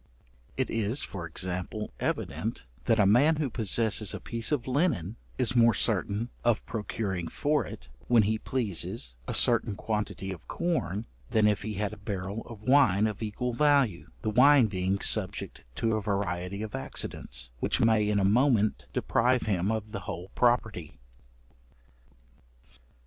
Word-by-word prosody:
It -, -, -1 dB
is 115 Hz, +4 st, -1 dB
(for 85 Hz, -4 st, -6 dB
example) 90 Hz, +4 st, -4 dB
evident, -, -, -3 dB, 0.2 s
that 115 Hz, -, +3 dB
a 105 Hz, -, +5 dB
man 130 Hz, +11 st, +5 dB
who 150 Hz, -4 st, -2 dB
possesses 110 Hz, -2 st, +1 dB
a -, -, -5 dB
piece 115 Hz, +2 st, -2 dB
of 135 Hz, -5 st, 0 dB
linen, 125 Hz, -, 0 dB, 0.2 s
is 125 Hz, -1 st, +1 dB
more 115 Hz, -1 st, +5 dB
certain, 105 Hz, +2 st, 0 dB
of 120 Hz, -2 st, +2 dB
procuring 105 Hz, -5 st, -3 dB
for 150 Hz, -, 0 dB
it, -, -, -9 dB, 0.2 s
when 120 Hz, -3 st, +5 dB
he 110 Hz, +2 st, 0 dB
pleases, 100 Hz, -, -2 dB
a -, -, -1 dB
certain 115 Hz, -3 st, +2 dB
quantity 105 Hz, -2 st, -3 dB
of 90 Hz, -3 st, -9 dB
corn, 115 Hz, -, -1 dB, 0.2 s
than 110 Hz, -1 st, +3 dB
if 105 Hz, -3 st, +2 dB
he 105 Hz, +1 st, -4 dB
had 105 Hz, +1 st, -2 dB
a -, -, -9 dB
barrel 100 Hz, +1 st, -4 dB
of 110 Hz, -3 st, -10 dB
wine 110 Hz, -6 st, +4 dB
of 105 Hz, -1 st, -3 dB
equal 120 Hz, +3 st, -2 dB
value: 140 Hz, -, +2 dB
the 110 Hz, -, 0 dB
wine 135 Hz, +3 st, +6 dB
being 95 Hz, -1 st, -1 dB
subject -, -, -1 dB
to 115 Hz, +6 st, +1 dB
a 110 Hz, -, -1 dB
variety 100 Hz, -1 st, -2 dB
of 110 Hz, -, -6 dB
accidents, -, -, -4 dB
which -, -, +1 dB
may 110 Hz, -2 st, +3 dB
in 105 Hz, -, +2 dB
a 100 Hz, -, +2 dB
moment 110 Hz, 0 st, +2 dB
deprive 125 Hz, +1 st, +2 dB
him 100 Hz, -1 st, 0 dB
of 110 Hz, -1 st, -3 dB
the 100 Hz, -, -4 dB
whole 90 Hz, +3 st, -5 dB
property. 110 Hz, -8 st, 0 dB
110 Hz, 155 wpm, -29 LUFS, 100-120 Hz, 0.2 s, wine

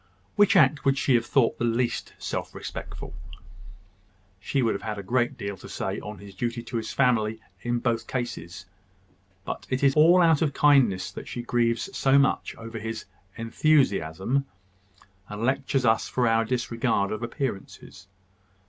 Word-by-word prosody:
Which 205 Hz, 0 st, +4 dB
act 150 Hz, -4 st, +4 dB
would 135 Hz, 0 st, +2 dB
she 135 Hz, -, +2 dB
have 120 Hz, -1 st, +2 dB
thought 125 Hz, -2 st, +2 dB
the -, -, -1 dB
least 120 Hz, +1 st, -1 dB
self -, -, -5 dB
respectful?" -, -, -7 dB, 1.3 s
"She 135 Hz, +7 st, -1 dB
would 115 Hz, -, +2 dB
have 100 Hz, -, -5 dB
had 110 Hz, -1 st, -4 dB
a 100 Hz, -, -6 dB
great 120 Hz, +5 st, 0 dB
deal 100 Hz, -3 st, -4 dB
to -, -, -12 dB
say -, -, -3 dB
on 105 Hz, 0 st, -8 dB
his 100 Hz, -1 st, -12 dB
duty 120 Hz, +2 st, -3 dB
to 120 Hz, 0 st, -4 dB
his 110 Hz, -1 st, -4 dB
family 110 Hz, -4 st, +1 dB, 0.2 s
in 120 Hz, 0 st, -1 dB
both 120 Hz, -1 st, -1 dB
cases. 95 Hz, -8 st, -5 dB, 0.8 s
But -, -, -5 dB
it 130 Hz, +1 st, -1 dB
is 135 Hz, -1 st, +5 dB
all 170 Hz, +4 st, +6 dB
out 165 Hz, -3 st, +4 dB
of 150 Hz, -4 st, +1 dB
kindness 115 Hz, -11 st, +3 dB
that -, -, -9 dB
she 120 Hz, -, -5 dB
grieves 120 Hz, -1 st, 0 dB
so 135 Hz, 0 st, +4 dB
much 140 Hz, -1 st, +1 dB
over 115 Hz, 0 st, -8 dB
his 110 Hz, +1 st, -5 dB, 0.3 s
`enthusiasm,' 115 Hz, -, +1 dB, 0.8 s
and 105 Hz, +2 st, -5 dB
lectures 130 Hz, +1 st, 0 dB
us 110 Hz, -1 st, +2 dB
for 125 Hz, -2 st, +1 dB
our 115 Hz, 0 st, +3 dB
disregard 115 Hz, -4 st, 0 dB
of 110 Hz, -, -4 dB
appearances. 115 Hz, -6 st, -5 dB
120 Hz, 165 wpm, -26 LUFS, 110-135 Hz, 1.3 s, all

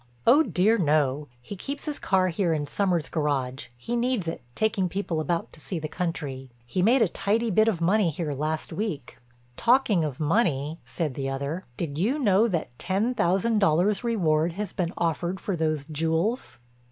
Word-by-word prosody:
"Oh, 290 Hz, +5 st, +7 dB
dear 220 Hz, -, +2 dB
no. 150 Hz, -3 st, +1 dB, 0.2 s
He 205 Hz, -, -7 dB
keeps 275 Hz, +9 st, -5 dB
his 300 Hz, -2 st, -2 dB
car 185 Hz, -1 st, +2 dB
here 170 Hz, -1 st, 0 dB
in 150 Hz, -2 st, -1 dB
Sommers' 175 Hz, -1 st, 0 dB
garage—he 135 Hz, -, -2 dB
needs 240 Hz, -6 st, 0 dB
it, 165 Hz, -, -4 dB
taking 205 Hz, -4 st, +1 dB
people 180 Hz, -3 st, -2 dB
about 165 Hz, +2 st, -2 dB
to -, -, -13 dB
see 180 Hz, +4 st, -5 dB
the 155 Hz, -1 st, -3 dB
country. 145 Hz, -6 st, -4 dB, 0.2 s
He 150 Hz, +10 st, -1 dB
made 235 Hz, +5 st, +5 dB
a -, -, +3 dB
tidy 220 Hz, +6 st, 0 dB
bit 215 Hz, +4 st, +4 dB
of 205 Hz, -7 st, +1 dB
money 190 Hz, +2 st, +3 dB
here 155 Hz, -1 st, -3 dB
last 155 Hz, +3 st, -3 dB
week." 185 Hz, -, -4 dB, 0.4 s
"Talking 235 Hz, -7 st, +3 dB
of 145 Hz, -4 st, -4 dB
money," 155 Hz, -, +1 dB
said 160 Hz, -6 st, -3 dB
the 135 Hz, +1 st, -3 dB
other, 140 Hz, +6 st, -3 dB
"did 150 Hz, -3 st, -3 dB
you 235 Hz, -, +1 dB
know 215 Hz, -5 st, +4 dB
that 165 Hz, -, -3 dB
ten 195 Hz, +7 st, 0 dB
thousand 210 Hz, +2 st, +2 dB
dollars' 195 Hz, +4 st, +2 dB
reward 170 Hz, -8 st, +1 dB
has 200 Hz, 0 st, -4 dB
been 175 Hz, -3 st, -1 dB
offered 170 Hz, +3 st, -1 dB
for 195 Hz, -, -2 dB
those 155 Hz, -3 st, -1 dB
jewels?" 165 Hz, -, -1 dB
175 Hz, 175 wpm, -26 LUFS, 155-210 Hz, 0.4 s, Oh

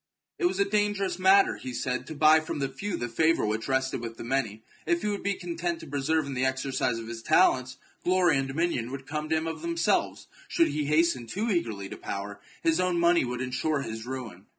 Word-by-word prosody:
It 360 Hz, -, +1 dB
was 355 Hz, -, +1 dB
a 200 Hz, -, +4 dB
dangerous 200 Hz, -3 st, 0 dB
matter, 195 Hz, +1 st, +5 dB
he 125 Hz, -1 st, -7 dB
said, 125 Hz, +1 st, -2 dB
to 155 Hz, -, -6 dB
buy 155 Hz, +2 st, +6 dB
from 155 Hz, -, -5 dB
the 135 Hz, -2 st, -1 dB
few 200 Hz, -3 st, -4 dB
the 120 Hz, -, -3 dB
favour 160 Hz, +7 st, +2 dB
which 110 Hz, +1 st, -2 dB
rested 130 Hz, -2 st, 0 dB
with 115 Hz, -1 st, -6 dB
the -, -, -7 dB
many. 115 Hz, -4 st, -2 dB, 0.2 s
If 340 Hz, -1 st, +1 dB
he 210 Hz, -, 0 dB
would 205 Hz, -1 st, -2 dB
be 200 Hz, 0 st, 0 dB
content 170 Hz, -1 st, -3 dB
to -, -, -9 dB
persevere 145 Hz, +2 st, 0 dB
in 140 Hz, -, -5 dB
the 130 Hz, 0 st, -1 dB
exercise 130 Hz, -2 st, 0 dB
of 115 Hz, -1 st, -7 dB
his 115 Hz, 0 st, -6 dB
talents, 130 Hz, -3 st, +3 dB, 0.3 s
glory 180 Hz, -4 st, +3 dB
and 135 Hz, -, -2 dB
dominion 135 Hz, -4 st, -1 dB
would 135 Hz, 0 st, -7 dB
come 150 Hz, +2 st, -4 dB
to 160 Hz, -, +2 dB
him 160 Hz, -, -2 dB
of 165 Hz, -, -4 dB
themselves: 335 Hz, 0 st, 0 dB, 0.2 s
should 335 Hz, -1 st, +2 dB
he 150 Hz, -1 st, -2 dB
hasten 150 Hz, -5 st, +2 dB
too 215 Hz, -, -2 dB
eagerly 110 Hz, -, -1 dB
to -, -, -8 dB
power, 100 Hz, +1 st, -5 dB, 0.2 s
his 165 Hz, +1 st, +3 dB
own 180 Hz, -1 st, +1 dB
money 170 Hz, 0 st, +4 dB
would 125 Hz, 0 st, -3 dB
ensure 140 Hz, +4 st, -1 dB
his 110 Hz, 0 st, -6 dB
ruin. 115 Hz, -7 st, -7 dB
145 Hz, 225 wpm, -28 LUFS, 125-175 Hz, 0.3 s, buy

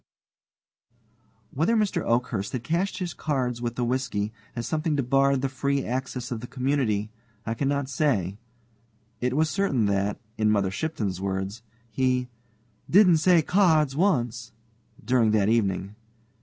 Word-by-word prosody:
Whether 165 Hz, -, +2 dB
Mr. 210 Hz, -3 st, +1 dB
Oakhurst 115 Hz, -4 st, -1 dB
had 125 Hz, -3 st, -3 dB
cached 175 Hz, +8 st, -1 dB
his 180 Hz, -3 st, -3 dB
cards 125 Hz, -5 st, -2 dB
with 120 Hz, -1 st, -3 dB
the 125 Hz, -, -1 dB
whisky 120 Hz, -4 st, -1 dB, 0.2 s
as 120 Hz, -1 st, -3 dB
something 155 Hz, -1 st, -1 dB
debarred 135 Hz, 0 st, +2 dB
the -, -, +2 dB
free 140 Hz, +1 st, -1 dB
access 125 Hz, 0 st, -4 dB
of 120 Hz, -, -2 dB
the 120 Hz, -, -8 dB
community, 125 Hz, -6 st, -1 dB, 0.3 s
I 115 Hz, -, -1 dB
cannot 140 Hz, +2 st, -1 dB
say. 110 Hz, -, 0 dB, 0.8 s
It 125 Hz, +2 st, -1 dB
was 160 Hz, +1 st, +3 dB
certain 145 Hz, -, +1 dB
that, 100 Hz, 0 st, 0 dB, 0.2 s
in 110 Hz, -1 st, +3 dB
Mother 100 Hz, -3 st, +2 dB
Shipton's 100 Hz, -, -3 dB
words, 95 Hz, +3 st, -3 dB, 0.3 s
he 125 Hz, +1 st, 0 dB, 0.6 s
"didn't 180 Hz, -3 st, +6 dB
say 170 Hz, 0 st, +4 dB
cards 160 Hz, -7 st, +3 dB
once" 125 Hz, -, 0 dB, 0.5 s
during 120 Hz, -1 st, +3 dB
that 105 Hz, -1 st, +3 dB
evening. 100 Hz, -3 st, 0 dB
125 Hz, 140 wpm, -26 LUFS, 110-145 Hz, 0.8 s, didn't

